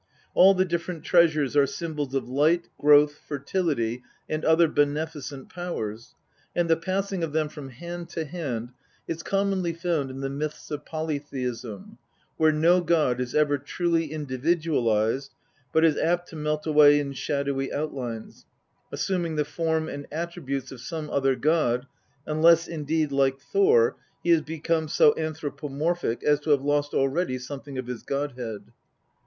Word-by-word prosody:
All 195 +2 +7
the 185 0 +3
different 170 -1 -3
treasures 160 -6 +3
are 140 -1 +5
symbols 150 -5 -4
of 135 - -1
light, 155 +7 +2
growth, 145 0 +5
fertility, 140 -5 -1 0.3
and 155 0 -3
other 160 +1 +5
beneficent 145 -2 -2
powers, 115 - -5 0.4
and 175 -1 +2
the 165 - +4
passing 190 +1 -2
of 155 -3 -3
them 155 -1 +1
from 145 -3 -9
hand 170 +6 -7
to 160 - -3
hand 135 -8 -4 0.4
is 165 0 -3
commonly 195 -2 0
found 165 -5 -1
in 130 +1 -7
the 135 - -1
myths 150 +2 -5
of 150 0 -4
polytheism, 135 - -5 0.4
where 160 -1 +4
no 170 +4 +4
god 155 -8 +2
is 125 -1 -4
ever 145 -2 +3
truly 165 +2 -1
individualised, 135 -5 0 0.4
but 160 +1 +4
is 155 -2 +3
apt 175 +2 0
to - - -10
melt 150 0 -2
away 150 -2 +6
in 140 -1 -3
shadowy 140 0 -2
outlines, 130 -7 -5 0.4
assuming 175 -4 -1
the 150 -1 +1
form 160 +1 -1
and 145 -2 -7
attri 170 +3 -5
butes 135 0 -3
of 130 -3 -9
some 155 +2 -5
other 135 -1 +2
god, 135 -5 +1 0.4
unless 165 +2 +4
indeed, 155 -1 -1
like 135 -1 +2
Thor, 440 - +3 0.3
he 170 - +2
has 165 -2 +5
become 160 +1 -1
so 150 -1 +5
anthropomorphic 155 -2 -2
as 150 -1 +3
to 150 - -6
have 140 -2 +4
lost 145 0 0
already 135 0 +1
something 135 +1 -7
of 130 - -3
his 125 -2 -6
god 140 +1 -2
head. 115 -5 -6
150 Hz, 155 wpm, -26 LUFS, 135-165 Hz, 0.4 s, All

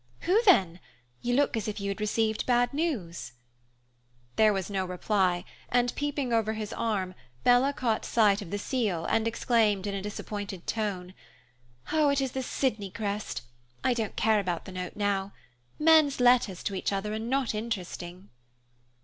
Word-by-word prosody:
"Who 400 +6 +3
then? 185 - +5 0.4
You 245 0 0
look 285 -2 +2
as 220 -2 -2
if 210 0 -3
you 200 0 -3
had 200 +2 -4
received 220 +1 0
bad 245 +1 +3
news." 225 - -3 1.0
There 215 -1 +5
was 195 -3 -2
no 195 -2 -1
reply, 180 -1 0 0.2
and, 245 0 +2
peeping 285 -4 -2
over 220 -1 +2
his 215 -1 -5
arm, 205 -5 -1 0.3
Bella 245 +3 +5
caught 240 -6 -1
sight 210 -3 +3
of 190 - -8
the 205 - -2
seal 205 -7 -1
and 225 0 +1
exclaimed, 220 -4 +2
in 200 - -2
a 195 - -3
disappointed 205 -2 -6
tone, 190 -5 -3 0.8
"It 290 -3 +3
is 265 -2 -1
the 265 - -3
Sydney 225 -6 -1
crest. 205 - -4 0.4
I 255 - +3
don't 225 -3 -3
care 220 -1 +3
about 180 -4 -2
the 190 - -8
note 180 -1 -5
now. 200 -1 -1 0.4
Men's 310 -3 +5
letters 245 -7 +3
to 200 - -2
each 190 - -1
other 200 +2 -2
are 215 - -2
not 250 +2 0
interesting." 190 -4 -5
215 Hz, 165 wpm, -28 LUFS, 195-245 Hz, 1.0 s, then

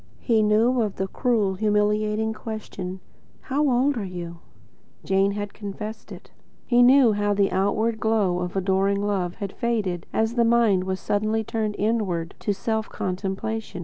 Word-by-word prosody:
He 225 -3 +2
knew 225 +4 +3
of 210 -3 -1
the 190 - -2
cruel, 215 -3 +1
humiliating 210 +2 +1
question: 205 -4 -6 0.4
"How 290 +1 0
old 260 +2 +2
are 220 - -2
you?" 175 -2 -7 0.7
Jane 195 +1 +2
had 205 0 -5
confessed 210 +1 -7
to - - -8
it. - - -17 0.3
He 240 -1 +4
knew 255 -1 +6
how 205 0 0
the 200 -1 +2
outward 215 +4 0
glow 205 -5 +1
of 180 +1 -4
adoring 195 +1 +1
love 185 -4 -1
had 200 -3 -5
faded 205 -7 -2
as 225 +1 0
the 235 -1 +2
mind 230 -5 +3
was 190 0 -2
suddenly 215 +2 0
turned 215 -1 -2
inward 200 -6 -1
to 210 - -1
self 220 +2 -2
contemplation. 195 +2 -4
210 Hz, 160 wpm, -24 LUFS, 190-225 Hz, 0.7 s, knew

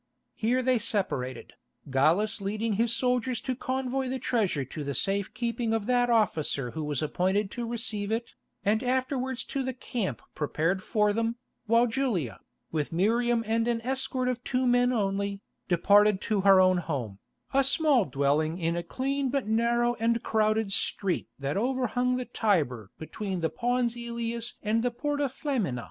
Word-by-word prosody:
Here 250 +3 +1
they 255 -1 +3
separated, 185 - -2 0.4
Gallus 180 +11 +2
leading 215 +3 -1
his 230 +3 +2
soldiers 250 0 0
to 260 -1 -2
convoy 260 +1 -2
the 265 - -1
treasure 210 - 0
to 150 +4 -6
the 140 -1 -3
safe 195 +7 0
keeping 235 -1 -1
of 220 -2 -2
that 245 0 +2
officer 155 - +1
who 160 - -4
was 150 -1 -1
appointed 190 +6 0
to 240 -1 -4
receive 225 -3 -2
it, 230 +1 -2 0.3
and 215 +2 +3
afterwards 260 0 -1
to 275 - -3
the 260 -1 -3
camp 210 - -3
prepared 165 +5 0
for 210 0 +1
them, 230 +1 0 0.3
while 230 +2 +5
Julia, 225 - -1 0.3
with 150 -3 -2
Miriam 230 +6 +2
and 225 +1 +1
an 235 -1 +1
escort 260 +1 -2
of 250 -1 -2
two 255 0 0
men 245 0 +4
only, 200 -3 -1 0.3
departed 200 +3 +4
to 210 -3 0
her 195 -1 +7
own 185 0 +5
home, 130 - -3 0.3
a 275 0 +4
small 280 - +3
dwelling 145 +4 +1
in 170 -1 0
a 175 - -1
clean 270 +9 -2
but 275 -2 -1
narrow 235 +2 +2
and 230 +1 +1
crowded 215 -1 +1
street 195 -2 -1
that 140 +5 -2
overhung 250 +1 +1
the 255 - -3
Tiber 145 - 0
between 190 +3 -4
the 160 - 0
Pons 245 0 0
Ælius 235 0 -4
and 220 +2 +1
the 245 - +1
Porta 290 +4 -1
Flamina. 245 - -2
225 Hz, 165 wpm, -28 LUFS, 185-245 Hz, 0.4 s, her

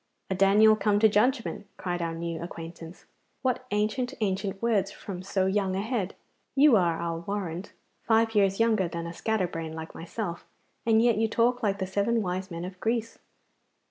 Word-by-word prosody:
'A - - +3
Daniel 205 +3 +6
come 210 -1 +2
to 220 +1 +6
judgment!' 215 -1 +1
cried 175 -1 -3
our 165 -1 -2
new 165 0 -4
acquaintance. 165 0 -9 0.4
'What 255 -1 0
ancient, 215 +4 -1
ancient 195 -1 -1
words 205 -4 +1
from 185 -3 -7
so 190 0 0
young 190 -1 +1
a 195 - 0
head! 220 -5 -2 0.4
You 280 -2 +7
are, 170 -5 +2
I'll 170 -1 -2
warrant, 185 -1 -4 0.3
five 225 0 +2
years 195 -2 +3
younger 220 -5 +3
than 170 0 -5
a 170 - -5
scatterbrain 175 -6 -2
like 160 0 -7
myself, 170 +1 -5 0.4
and 225 0 +5
yet 235 -3 +4
you 225 - +3
talk 240 +3 +2
like 200 -3 +1
the 190 - -2
seven 205 +4 +1
wise 185 +1 -3
men 170 0 -5
of 185 0 -9
Greece. 230 0 -1
200 Hz, 175 wpm, -28 LUFS, 175-220 Hz, 0.4 s, You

